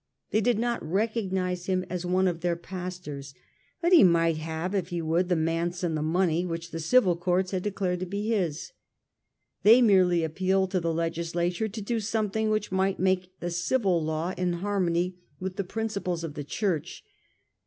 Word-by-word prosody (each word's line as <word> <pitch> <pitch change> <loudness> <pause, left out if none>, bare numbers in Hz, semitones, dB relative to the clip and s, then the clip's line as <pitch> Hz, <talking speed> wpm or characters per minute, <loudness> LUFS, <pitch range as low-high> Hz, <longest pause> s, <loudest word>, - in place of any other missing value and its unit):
They 215 - +2
did 240 0 +2
not 235 +1 -1
recognise 190 -1 -1
him 185 -1 0
as 180 0 -4
one 185 +1 +2
of 170 -2 -2
their 175 -1 +1
pastors, 170 -6 -7 0.5
but 345 +2 +3
he 345 - +9
might 165 -3 +4
have, 160 +4 -4
if 190 -4 0
he 175 -2 -3
would, 165 +3 0
the 180 - +3
manse 165 +2 -1
and 165 -3 0
the 155 - -1
money 170 +1 +1
which 170 -1 -5
the 165 - -4
civil 185 +2 +4
courts 180 +1 0
had 185 -2 -1
declared 185 -3 -1
to 185 - -4
be 205 +4 -3
his. 180 - -1 0.9
They 225 +4 +7
merely 185 -7 +4
appealed 190 +4 0
to 185 - +1
the 165 -1 -1
Legislature 170 +4 -1
to 215 +1 -6
do 230 +3 -1
something 220 0 -1
which 215 -2 -1
might 190 +1 +1
make 185 0 0
the 175 - -2
civil 175 0 +1
law 160 +3 -2
in 180 -1 0
harmony 180 -1 -1 0.2
with 185 0 -5
the 200 - 0
principles 200 -4 -3
of 160 -3 -5
the 145 - -5
Church. 175 +1 -2
180 Hz, 185 wpm, -27 LUFS, 170-195 Hz, 0.9 s, he